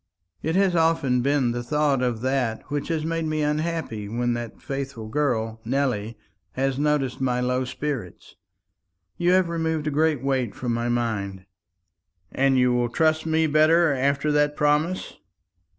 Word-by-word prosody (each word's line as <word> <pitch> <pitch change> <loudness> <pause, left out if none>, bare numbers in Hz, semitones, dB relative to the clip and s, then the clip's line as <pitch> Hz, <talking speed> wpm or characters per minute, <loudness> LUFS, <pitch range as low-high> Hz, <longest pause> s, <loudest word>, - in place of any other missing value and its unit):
It 160 +2 -1
has 190 -2 +3
often 160 -7 +2
been 135 -2 +2
the 120 0 -3
thought 140 +1 +1
of 120 -3 -1
that 130 -2 -1
which 145 -1 -2
has 160 -2 -1
made 165 0 -1
me 155 -1 -1
unhappy 150 -8 -2
when 120 +2 0
that 120 -1 -6
faithful 135 -5 -5
girl, 115 -4 -1
Nelly, 115 -4 -1 0.4
has 135 0 -1
noticed 145 -4 0
my 125 -2 +1
low 125 +1 0
spirits. 130 - -5 0.8
You 175 +1 +3
have 185 -1 +4
removed 160 -2 -1
a 150 - 0
great 150 -2 +1
weight 130 -5 -1
from 120 -2 -2
my 120 +1 -1
mind." 105 -6 -2 0.9
"And 135 0 +2
you 125 -1 +3
will 120 -1 +1
trust 155 +4 +1
me 160 0 +2
better 155 +1 +4
after 140 +2 +1
that 150 0 +2
promise?" 150 +5 0
140 Hz, 155 wpm, -24 LUFS, 120-155 Hz, 0.9 s, have